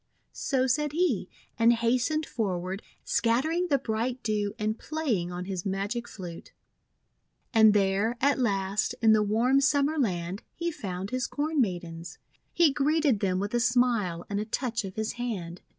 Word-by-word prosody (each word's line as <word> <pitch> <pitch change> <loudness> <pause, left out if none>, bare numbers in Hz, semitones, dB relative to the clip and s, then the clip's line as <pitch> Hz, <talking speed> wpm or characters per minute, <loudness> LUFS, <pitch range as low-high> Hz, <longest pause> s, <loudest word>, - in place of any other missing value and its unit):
So 260 -2 0
said 295 +3 0
he, 310 - +1 0.3
and 230 +1 +6
hastened 250 +7 +1
forward, 190 - -3 0.2
scattering 310 +10 +1
the 285 -4 +3
bright 240 +1 -2
Dew 210 -2 -1
and 215 +1 -2
playing 245 - -2
on 180 0 -5
his 185 -2 -4
magic 200 +5 -2
flute. 175 -4 -9 1.0
And 220 -2 +6
there, 200 +4 +2
at 280 +1 +2
last, 200 -4 0
in 220 -1 +7
the 215 - +4
warm 235 +6 +3
Summer 285 +2 +2
Land, 185 -5 -1
he 340 0 -2
found 195 - -5
his 255 -1 -1
Corn 300 0 0
Maidens. 175 -5 -4 0.3
He 330 -5 +4
greeted 290 -4 +2
them 185 -2 0
with 205 +3 -3
a 240 - +2
smile 235 -8 +1
and 200 0 -2
a 210 - -2
touch 235 0 -2
of 190 - -7
his 220 0 -2
hand. 180 -8 -4
225 Hz, 160 wpm, -28 LUFS, 195-265 Hz, 1.0 s, in